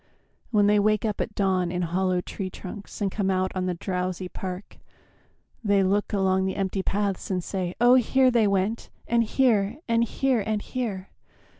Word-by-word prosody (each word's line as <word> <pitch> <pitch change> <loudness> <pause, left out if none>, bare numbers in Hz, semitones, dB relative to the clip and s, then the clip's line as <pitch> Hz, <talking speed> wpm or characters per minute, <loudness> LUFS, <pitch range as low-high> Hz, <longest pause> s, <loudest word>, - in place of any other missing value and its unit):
When 210 -3 +3
they 205 0 +4
wake 215 +1 +2
up 210 -2 -1
at 220 - -4
dawn 185 -3 +1
in 180 0 -1
hollow 180 +1 0
tree 190 +1 -5
trunks 200 +3 -9
And 195 -2 0
come 195 -1 -1
out 185 0 +1
on 185 -1 -2
the 180 - -1
drowsy 185 0 -3
park, 185 +1 -7 0.8
they 200 -2 +3
look 200 +2 +1
Along 190 -2 +1
the 190 - -2
empty 195 0 -1
paths 200 0 -2
and 185 -2 -1
say, 185 -2 -3
"Oh, 240 +1 +6
here 260 +1 +4
They 230 -3 +3
went, 200 +3 -1 0.2
and 235 0 +3
here, 220 -3 +2
and 230 -1 +3
here, 260 +1 +1
and 215 +1 -1
here! 210 -7 -4
195 Hz, 180 wpm, -25 LUFS, 185-215 Hz, 0.8 s, Oh